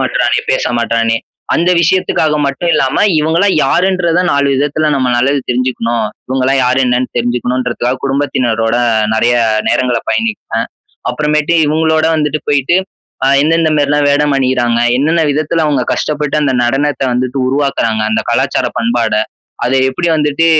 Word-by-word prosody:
மாட்றானே, - - 0
பேச - - 0
மாட்றானே, 115 -1 0 0.4
அந்த 175 +2 +2
விஷயத்துக்காக 160 -3 +1
மட்டும் 140 +5 -1
இல்லாம 130 - 0 0.2
இவங்கலாம் 165 +6 +1
யாருன்றத 180 +2 +1
நாலு 140 0 +1
விதத்துல 150 +2 0
நம்ம 130 -2 0
நல்லாவே 135 +3 +1
தெரிஞ்சுக்கணும். 120 -2 -1 0.2
இவங்கலாம் 130 +1 +1
யாரு 125 +1 +1
என்னன்னு 125 +1 0
தெரிஞ்சுக்கணும்ன்றதுக்காக 125 +1 -1
குடும்பத்தினரோட 125 -5 0 0.4
நெறைய 120 +2 +2 0.3
நேரங்கள 125 -2 +1
பயணிப்பேன். 225 -2 -2 0.4
அப்பறமேட்டு 150 +2 0
இவங்களோட 160 +1 +1
வந்துட்டு 150 0 -1
போயிட்டு, 145 +3 +2 0.5
அ - - +2 0.2
எந்த 160 +2 +2
எந்த 160 -1 +1
மாரிலாம் 145 0 +1
வேடம் 145 0 +1
அணியறாங்க, 125 -3 +1 0.2
என்னென்ன 160 +4 +1
விதத்துல 155 +2 -1
அவங்க 140 -4 0
கஷ்டப்பட்டு 150 -1 -2
அந்த 140 -2 +1
நடனத்த 140 +4 -1
வந்துட்டு 125 +2 -2
உருவாக்குறாங்க, 135 -5 0
அந்த 110 - +1
கலாச்சார - - 0
பண்பாட. 115 -1 0 0.5
அத 125 - 0 0.2
எப்படி 170 +6 -2
வந்துட்டு, 150 +1 +1
140 Hz, 135 wpm, -13 LUFS, 125-155 Hz, 0.5 s, அந்த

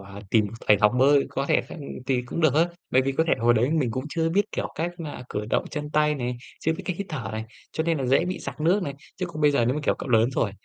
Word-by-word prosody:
à, 100 +1 -10
tìm 110 -2 +4 0.2
thầy 105 - +7
học 105 0 +5
bơi, 140 +2 +5
có 135 +1 -2
thể - - +3
th - - -10 0.3
thì 125 -2 +1
cũng 125 +7 -4
được 155 -5 +4
á. 165 +3 +4 0.2
Bởi 130 - +4
vì 135 +1 0
có 160 +4 +2
thể - - +2
hồi 120 +1 +4
đấy 120 +4 +2
mình 150 -7 +1
cũng 130 +4 -3
chưa 165 +1 0
biết, 195 +5 +3
kiểu, - - -2
cách 165 +3 -1
mà 150 -6 -6
cử 105 - -3
động - - +2
chân 150 -1 -4
tay 150 0 +3
này, 125 -3 -3 0.2
chưa 160 - +1
biết 160 - -6
cách 180 - -2
hít 200 - -4
thở 135 -11 -4
này, 110 +1 -3 0.3
cho 160 - -1
nên 165 -2 +1
là 135 - -2
dễ 135 +6 +3
bị 180 +1 -3
sặc 140 +1 -7
nước 180 +6 +3
này. 140 -5 -4 0.2
Chứ 185 - -2
còn 160 -3 -7
bây 150 -1 +5
giờ 140 -5 +2
nếu 125 +3 +1
mà, 150 - -2
kiểu, - - +3
cậu - - -6
lớn 115 0 +4
rồi, 120 -5 0
140 Hz, 305 wpm, -25 LUFS, 125-160 Hz, 0.3 s, thầy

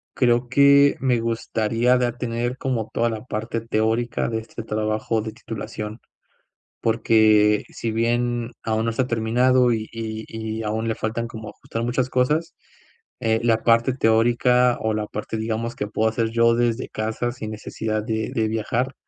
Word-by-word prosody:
Creo 120 -1 +2
que 140 +1 +6
me 125 -3 +2
gustaría 115 +1 +1
ya 125 -1 +1
tener 120 +1 -3
como 120 -5 -2
toda 115 0 +1
la 110 -2 -5
parte 115 0 -3
teórica 115 +1 0
de 115 -1 -1
este 115 +1 -8
trabajo 110 +1 -1
de 110 0 -5
titulación, 110 0 -7 0.8
porque 110 -2 +4
si 115 - -4
bien 120 +1 0
aún 110 0 0
no 115 - +1
está 125 +3 0
terminado 125 +2 +3
y 110 -1 -2
y 110 -1 -5 0.3
y 115 - -3
aún 110 +1 -2
le 110 - 0
faltan 115 +2 -3
como 110 -2 -8
ajustar 115 +2 -5
muchas 125 +1 -1
cosas, 150 +7 +1 0.7
eh, 110 -2 +1
la 115 -1 +2
parte 115 +2 +3
teórica 120 +1 +3
o 110 0 0
la 105 -1 -2
parte, 105 +2 -5
digamos, 115 +1 -2
que 105 - -2
puedo 110 +1 +1
hacer 115 0 0
yo 115 0 +4
desde 120 0 0
casa 110 +3 -2
sin 110 -4 -6
necesidad 110 0 -3
de 110 0 -2
de 110 -1 +1
viajar 115 +4 -1
115 Hz, 165 wpm, -23 LUFS, 110-120 Hz, 0.8 s, que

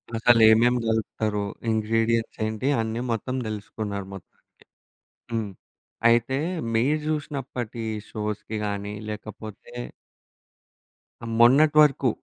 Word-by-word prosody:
అసలు 115 +1 +5
ఏమేమి 120 +3 +4
కలుపుతరు? 110 -1 -1 0.3
ఇంగ్రీడియెంట్స్ 115 +1 0
ఏంటి? 110 +4 -2
అన్నీ 110 +1 -3
మొత్తం 115 +3 -2
తెలుసుకున్నారు 105 -1 -5
మొత్తానికి. 95 -3 -13 0.9
హ్మ్. 110 -3 -2 0.6
అయితే 120 +3 +2 0.4
మీరు 140 +7 +2
చూసినప్పటి 135 -6 -4 0.3
షోస్‌కి 105 0 -4
గాని 100 0 -3 0.2
లేకపోతే... 110 0 -8 1.7
మొన్నటి 140 +6 +6
వరకు. 135 -3 +2
115 Hz, 90 wpm, -25 LUFS, 105-120 Hz, 1.7 s, మొన్నటి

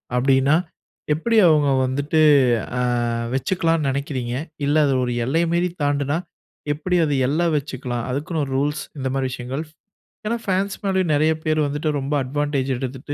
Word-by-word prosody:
அப்பிடீன்னா, 135 +3 +3 0.6
எப்பிடி 225 +9 0
அவுங்க 150 -3 +4 0.2
வந்துட்டு 145 +4 0 0.6
அ - - +1 0.5
வச்சுக்கலான்னு 165 +1 0
நினைக்கிறீங்க? 130 -3 -3 0.3
இல்ல 145 - +1
அது 135 - +2
ஒரு 125 - -1
எல்லை 155 +7 +1
மீறி 175 +1 +1
தாண்டுனா, 145 +1 0 0.6
எப்பிடி 180 +5 -1
அது 145 -2 0
எல்ல 150 +5 0
வச்சுக்கலாம். 130 -4 -3
அதுக்குன்னு 155 +5 -2
ஒரு 135 - -7
ரூல்ஸ் 150 +2 -1 0.2
இந்த 130 - -2
மாதிரி 135 -1 0
விஷயங்கள். 125 +5 -4 0.6
ஏன்னா, 230 +2 0
ஃபேன்ஸ் 195 +1 0
மேலேயும் 190 -4 +1
நெறைய 155 +2 +3
பேரு 155 0 +1
வந்துட்டு 150 +2 -2
ரொம்ப 135 +2 -3
அட்வான்டேஜ் 140 0 -1
எடுத்துட்டு, 130 +2 -5
145 Hz, 145 wpm, -22 LUFS, 135-160 Hz, 0.6 s, அவுங்க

